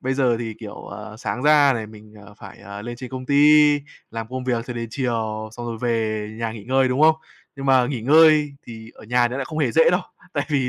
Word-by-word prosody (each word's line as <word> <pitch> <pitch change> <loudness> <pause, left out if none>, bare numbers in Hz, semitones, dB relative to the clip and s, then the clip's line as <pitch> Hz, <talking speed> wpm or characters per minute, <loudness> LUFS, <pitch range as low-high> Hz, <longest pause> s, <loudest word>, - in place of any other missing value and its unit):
bây 130 +1 -2
giờ 125 -4 +2
thì, 115 -2 -5
kiểu, 105 -2 -8
ờ, 105 +1 -10
sáng 125 +2 -4
ra 150 -2 +5
này, 110 -2 -4
mình, 105 0 -15
ờ, 105 - -15
phải, - - -12
ờ, 100 +1 -9
lên 120 +1 -7
trên 125 +1 -9
công 130 -1 -7
ty, 150 +1 +5 0.3
làm 115 -1 -5
công 130 0 -5
việc 120 -2 -2
cho 125 - -5
đến 115 -1 -5
chiều 110 -4 -3
xong 120 0 -7
rồi 115 -1 -5
về 110 -3 -1
nhà 115 -1 -3
nghỉ 105 -3 -10
ngơi, 130 +1 +2
đúng 130 +3 -1
không? 160 0 +6 0.4
Nhưng 135 0 -6
mà 130 -2 +4
nghỉ 130 -4 -4
ngơi 150 +2 +5
thì 115 -1 -10
ở - - -15
nhà 120 +2 +2
nó 125 - -5
lại 135 - -3
không 155 +2 -6
hề 140 -6 +1
dễ 160 0 +5
đâu, 180 +2 +1 0.3
tại 145 -3 -1
vì 135 -4 0
125 Hz, 255 wpm, -22 LUFS, 110-140 Hz, 0.4 s, không